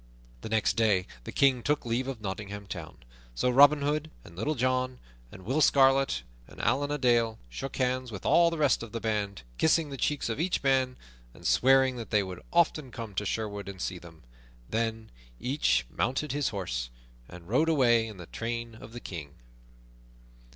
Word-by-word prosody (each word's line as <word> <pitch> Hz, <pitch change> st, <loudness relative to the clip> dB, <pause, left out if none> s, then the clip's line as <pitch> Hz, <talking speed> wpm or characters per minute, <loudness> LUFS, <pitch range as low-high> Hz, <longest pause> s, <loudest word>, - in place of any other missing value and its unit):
The -, -, -6 dB
next 110 Hz, -1 st, +1 dB
day 105 Hz, -5 st, +3 dB, 0.2 s
the -, -, -6 dB
King 135 Hz, -3 st, +3 dB
took 145 Hz, +2 st, 0 dB
leave 120 Hz, +3 st, -1 dB
of 130 Hz, -5 st, -5 dB
Nottingham 100 Hz, 0 st, -5 dB
Town; 85 Hz, -3 st, -8 dB, 0.4 s
so 125 Hz, -, +1 dB
Robin 145 Hz, +3 st, +6 dB
Hood 150 Hz, +2 st, -1 dB
and 85 Hz, -, -14 dB
Little 145 Hz, -, -1 dB
John 130 Hz, 0 st, 0 dB, 0.3 s
and 95 Hz, -, -12 dB
Will 135 Hz, +8 st, +1 dB
Scarlet 135 Hz, -, +4 dB, 0.2 s
and -, -, -14 dB
Allan 145 Hz, +2 st, +1 dB
a 145 Hz, -, -1 dB
Dale 120 Hz, -4 st, +2 dB
shook 135 Hz, -, -6 dB
hands 130 Hz, -1 st, -1 dB
with 100 Hz, -4 st, -8 dB
all 170 Hz, 0 st, +5 dB
the 165 Hz, -, -4 dB
rest 145 Hz, -5 st, +3 dB
of 115 Hz, -1 st, -8 dB
the 115 Hz, -, -2 dB
band, 105 Hz, -6 st, -2 dB, 0.2 s
kissing 160 Hz, -2 st, +3 dB
the 135 Hz, -, -5 dB
cheeks 145 Hz, +2 st, 0 dB
of 115 Hz, +3 st, -3 dB
each 175 Hz, 0 st, 0 dB
man, 130 Hz, -2 st, +2 dB, 0.4 s
and -, -, -15 dB
swearing 130 Hz, 0 st, +4 dB
that 115 Hz, -, -7 dB
they 105 Hz, -2 st, +3 dB
would 90 Hz, -1 st, -7 dB
often 160 Hz, -5 st, +2 dB
come 115 Hz, -4 st, -7 dB
to 100 Hz, +2 st, -2 dB
Sherwood 105 Hz, -1 st, -3 dB
and 95 Hz, -1 st, -9 dB
see 90 Hz, 0 st, -3 dB
them. 85 Hz, -4 st, -15 dB, 0.4 s
Then 110 Hz, -, -2 dB, 0.3 s
each 135 Hz, -, +1 dB
mounted 135 Hz, -, -1 dB
his 145 Hz, -1 st, 0 dB
horse -, -, -3 dB, 0.4 s
and 90 Hz, -1 st, -12 dB
rode 135 Hz, -, +2 dB
away 120 Hz, -7 st, +4 dB
in 110 Hz, -3 st, -9 dB
the 90 Hz, -, -9 dB
train 115 Hz, +4 st, -4 dB
of 110 Hz, +1 st, -12 dB
the 120 Hz, -, -6 dB
King. 80 Hz, -10 st, -8 dB
120 Hz, 185 wpm, -29 LUFS, 100-135 Hz, 0.4 s, Robin